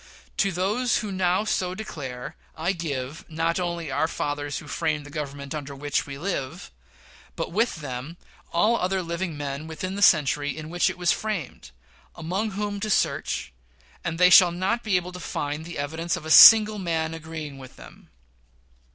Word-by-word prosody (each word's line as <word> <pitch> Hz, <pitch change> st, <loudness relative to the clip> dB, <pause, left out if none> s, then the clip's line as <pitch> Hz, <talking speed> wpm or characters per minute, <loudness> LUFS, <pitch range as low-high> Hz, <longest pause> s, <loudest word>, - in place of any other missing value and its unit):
To 195 Hz, -, +2 dB
those 210 Hz, +7 st, 0 dB
who 205 Hz, -, -4 dB
now 185 Hz, +1 st, +1 dB
so 185 Hz, -4 st, -1 dB
declare, 135 Hz, -11 st, -7 dB, 0.2 s
I 170 Hz, +4 st, 0 dB
give 145 Hz, -4 st, -5 dB
not 165 Hz, +2 st, -1 dB
only 170 Hz, -4 st, -3 dB
"our 145 Hz, +4 st, +1 dB
fathers 145 Hz, -2 st, -3 dB
who 150 Hz, -, -9 dB
framed 155 Hz, -1 st, -2 dB
the 145 Hz, -, -11 dB
Government 140 Hz, -2 st, -5 dB
under 145 Hz, -2 st, -6 dB
which 145 Hz, +1 st, -2 dB
we 140 Hz, -1 st, -7 dB
live," 165 Hz, -, -4 dB, 0.6 s
but -, -, -4 dB
with 210 Hz, -3 st, 0 dB
them 140 Hz, +4 st, -6 dB, 0.3 s
all 215 Hz, +7 st, +3 dB
other 190 Hz, -1 st, -1 dB
living 170 Hz, -1 st, -4 dB
men 145 Hz, +1 st, -5 dB
within 185 Hz, +4 st, -5 dB
the 200 Hz, -, -4 dB
century 145 Hz, -5 st, +3 dB
in 155 Hz, 0 st, -7 dB
which 175 Hz, 0 st, +2 dB
it -, -, -6 dB
was 175 Hz, -1 st, +2 dB
framed, 205 Hz, -, -4 dB, 0.5 s
among 185 Hz, +6 st, -2 dB
whom 205 Hz, -1 st, -2 dB
to 215 Hz, +1 st, -3 dB
search, 65 Hz, -, 0 dB, 0.5 s
and 165 Hz, -1 st, -3 dB
they 180 Hz, +1 st, +6 dB
shall 180 Hz, 0 st, +8 dB
not 190 Hz, +7 st, -1 dB
be 210 Hz, -4 st, +1 dB
able 180 Hz, 0 st, -1 dB
to 180 Hz, -, -9 dB
find 150 Hz, -2 st, -4 dB
the 170 Hz, -, -7 dB
evidence 160 Hz, +4 st, -2 dB
of -, -, -9 dB
a 160 Hz, -, -3 dB
single 215 Hz, +5 st, +9 dB
man 165 Hz, -3 st, -1 dB
agreeing 160 Hz, -3 st, -7 dB
with 130 Hz, -1 st, -12 dB
them. -, -, -15 dB
165 Hz, 175 wpm, -25 LUFS, 145-185 Hz, 0.6 s, single